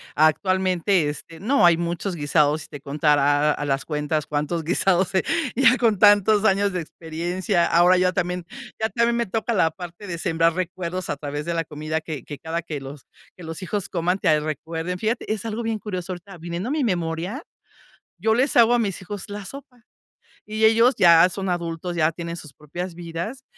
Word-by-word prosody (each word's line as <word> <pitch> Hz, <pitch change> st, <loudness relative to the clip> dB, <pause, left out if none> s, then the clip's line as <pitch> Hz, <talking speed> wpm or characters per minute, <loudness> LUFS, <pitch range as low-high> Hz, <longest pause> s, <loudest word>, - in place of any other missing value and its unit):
Actualmente, 185 Hz, +1 st, +2 dB
este, 160 Hz, +2 st, -9 dB
no, 245 Hz, 0 st, +3 dB
hay 170 Hz, -1 st, +6 dB
muchos 170 Hz, +2 st, -3 dB
guisados 150 Hz, 0 st, +2 dB
si -, -, -10 dB
te 145 Hz, -, -8 dB
contara 145 Hz, +1 st, +2 dB
a 145 Hz, -, -3 dB
las 135 Hz, -1 st, 0 dB
cuentas 150 Hz, 0 st, -2 dB
cuántos 150 Hz, +3 st, -2 dB
guisados, 180 Hz, +3 st, +1 dB
eh, 190 Hz, -, +2 dB, 0.3 s
ya 255 Hz, -2 st, +6 dB
con 225 Hz, -5 st, +2 dB
tantos 205 Hz, 0 st, +5 dB
años 200 Hz, 0 st, +3 dB
de 180 Hz, -, -2 dB
experiencia. 170 Hz, +3 st, -2 dB
Ahora 175 Hz, +2 st, +5 dB
ya 185 Hz, 0 st, +2 dB
también, 180 Hz, 0 st, -2 dB, 0.3 s
ya 220 Hz, -, +1 dB
también 235 Hz, 0 st, +1 dB
me 235 Hz, -, 0 dB
toca 225 Hz, +3 st, -2 dB
la 165 Hz, -6 st, +3 dB
parte 180 Hz, +1 st, -9 dB
de 170 Hz, -, -4 dB
sembrar 165 Hz, 0 st, +1 dB
recuerdos 180 Hz, 0 st, -4 dB
a 150 Hz, -, -2 dB
través 145 Hz, 0 st, -5 dB
de 170 Hz, -, -2 dB
la 165 Hz, -1 st, -1 dB
comida 155 Hz, +1 st, -3 dB
que 155 Hz, -5 st, -7 dB
que 145 Hz, -, -8 dB
cada 165 Hz, +1 st, -3 dB
que 155 Hz, -3 st, -5 dB
los 135 Hz, 0 st, -10 dB, 0.3 s
que 180 Hz, -, -12 dB
los 165 Hz, +3 st, -7 dB
hijos 200 Hz, +1 st, -3 dB
coman 180 Hz, +2 st, 0 dB
te 155 Hz, -, +3 dB
recuerden, 160 Hz, +4 st, -4 dB
fíjate, 220 Hz, 0 st, -1 dB
es 215 Hz, -, -5 dB
algo 225 Hz, +1 st, -3 dB
bien 225 Hz, -1 st, -2 dB
curioso. 185 Hz, -3 st, -5 dB
Ahorita 180 Hz, +1 st, -11 dB
viniendo 170 Hz, +7 st, -5 dB
a -, -, -2 dB
mi 300 Hz, -3 st, 0 dB
memoria, 175 Hz, -, -2 dB, 0.7 s
yo 220 Hz, 0 st, +2 dB
les 260 Hz, +5 st, +1 dB
hago 235 Hz, 0 st, +6 dB
a 240 Hz, -, +3 dB
mis 200 Hz, -6 st, -2 dB
hijos 205 Hz, +1 st, -7 dB
la 205 Hz, -1 st, -6 dB
sopa 260 Hz, -3 st, -11 dB, 0.6 s
y 215 Hz, +1 st, -3 dB
ellos 230 Hz, +4 st, +5 dB
ya 170 Hz, -1 st, +7 dB
son 190 Hz, +1 st, -4 dB
adultos, 170 Hz, 0 st, -3 dB
ya 160 Hz, -1 st, +2 dB
tienen 170 Hz, 0 st, -6 dB
sus 155 Hz, -5 st, -10 dB
propias 175 Hz, +5 st, -7 dB
vidas 175 Hz, +9 st, -6 dB
175 Hz, 195 wpm, -23 LUFS, 160-205 Hz, 0.7 s, ya